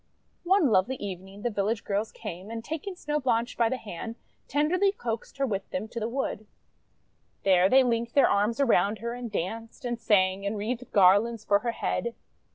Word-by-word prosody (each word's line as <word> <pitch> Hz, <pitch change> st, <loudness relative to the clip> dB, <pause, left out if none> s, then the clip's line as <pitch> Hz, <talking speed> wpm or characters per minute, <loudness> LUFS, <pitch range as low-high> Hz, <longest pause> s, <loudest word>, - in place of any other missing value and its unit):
One 350 Hz, -, +4 dB
lovely 215 Hz, +7 st, +3 dB
evening 195 Hz, -1 st, -7 dB
the 240 Hz, -, 0 dB
village 205 Hz, +1 st, -1 dB
girls 205 Hz, +2 st, -1 dB
came, 180 Hz, +4 st, -8 dB
and, 225 Hz, 0 st, -6 dB
taking 320 Hz, +6 st, -5 dB
Snow 300 Hz, -4 st, -2 dB
Blanche 240 Hz, -3 st, 0 dB
by 230 Hz, -1 st, +2 dB
the 260 Hz, -, -1 dB
hand, 225 Hz, +1 st, -7 dB, 0.3 s
ten 295 Hz, +2 st, +1 dB
derly 390 Hz, +4 st, +2 dB
coaxed 230 Hz, +2 st, -4 dB
her 275 Hz, -, +1 dB
with 195 Hz, -6 st, -3 dB
them 195 Hz, +4 st, -3 dB
to 235 Hz, -, -5 dB
the 220 Hz, +1 st, -2 dB
wood. 235 Hz, -4 st, -3 dB, 1.0 s
There 185 Hz, -1 st, +5 dB
they 265 Hz, +3 st, +6 dB
linked 235 Hz, -1 st, -1 dB
their 280 Hz, -, +6 dB
arms 210 Hz, +5 st, +1 dB
around 215 Hz, -6 st, +3 dB
her 235 Hz, +2 st, -4 dB
and 245 Hz, -1 st, -6 dB
danced, 225 Hz, -, -4 dB
and 240 Hz, -1 st, -2 dB
sang, 195 Hz, -3 st, +2 dB
and 200 Hz, +2 st, -2 dB
wreathed 235 Hz, +4 st, -4 dB
garlands 205 Hz, +4 st, +4 dB
for 200 Hz, 0 st, +4 dB
her 235 Hz, 0 st, -2 dB
head. 235 Hz, +1 st, -2 dB
230 Hz, 190 wpm, -27 LUFS, 200-250 Hz, 1.0 s, they